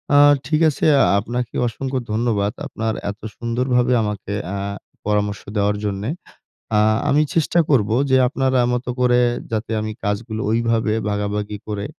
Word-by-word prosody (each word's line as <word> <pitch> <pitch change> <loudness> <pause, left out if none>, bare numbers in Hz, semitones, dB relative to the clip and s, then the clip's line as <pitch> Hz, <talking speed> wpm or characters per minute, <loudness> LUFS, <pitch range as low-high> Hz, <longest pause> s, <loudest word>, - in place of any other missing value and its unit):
আ - - +7 0.3
ঠিক 155 +4 +1
আছে, 145 - -2 0.2
আ - - +6 0.2
আপনাকে 120 +3 -4
অসংখ্য 130 +3 -3
ধন্যবাদ। 110 -3 0 0.2
আপনার 110 -4 -2 0.2
এত 105 - -13 0.2
সুন্দরভাবে 125 +1 +1
আমাকে 105 -1 -4 0.2
আ - - -2 0.5
পরামর্শ 105 0 0 0.2
দেওয়ার 105 0 +1
জন্যে। 100 +3 -2 0.7
আ - - +5 0.3
আমি 150 +2 +4
চেষ্টা 165 +1 +2
করবো 110 -6 +3 0.2
যে 130 - +5
আপনার 130 0 0
আ - - +2
মতো 125 0 -2
করে 125 -1 +4 0.3
যাতে 110 0 -2
আমি 110 0 -3
কাজগুলো 110 +2 -2
ঐভাবে 115 -1 +1 0.2
ভাগাভাগি 105 0 -2
করে 105 -1 -3
115 Hz, 150 wpm, -21 LUFS, 105-125 Hz, 0.7 s, আ